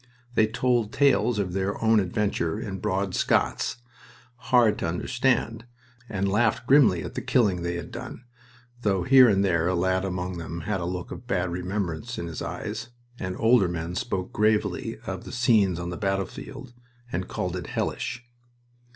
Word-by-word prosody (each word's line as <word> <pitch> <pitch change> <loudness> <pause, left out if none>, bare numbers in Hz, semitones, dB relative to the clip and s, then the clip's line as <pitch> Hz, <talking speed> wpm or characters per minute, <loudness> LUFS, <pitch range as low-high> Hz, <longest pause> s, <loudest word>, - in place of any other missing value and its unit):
They 110 -2 +4
told 120 -1 +1
tales 135 -4 +3
of 95 -4 -1
their 95 +1 -1
own 110 -1 +4
adventure 100 -1 -1
in 100 -4 -5
broad 95 -2 -1
Scots, - - +1 0.6
hard 120 -2 +3
to - - -1
understand, 115 +5 0 0.4
and 100 -1 -1
laughed 115 +3 +1
grimly 125 - +5
at - - -7
the - - -3
killing 100 -8 +2
they 85 0 -2
had 85 - -6
done, 125 +1 -8 0.6
though 95 -5 +1
here 130 +2 +7
and 100 -1 +3
there 85 -3 +2
a 95 - +1
lad 95 +1 +1
among 90 -1 -3
them 85 0 -5
had 95 +2 -2
a - - -2
look 90 0 -4
of 120 - -8
bad 90 -6 0
remembrance 90 +4 -3
in 85 - -3
his 85 -3 -6
eyes, - - -5 0.3
and 90 -1 -3
older 115 -4 +4
men 85 0 -4
spoke 95 -3 -3
gravely 105 0 +1
of - - -5
the - - -9
scenes 110 -7 +3
on 85 0 -4
the 90 - -5
battlefield 105 +6 -4 0.4
and 90 -1 -2
called - - -3
it - - -5
"hellish." 120 0 -3
100 Hz, 170 wpm, -26 LUFS, 90-115 Hz, 0.6 s, here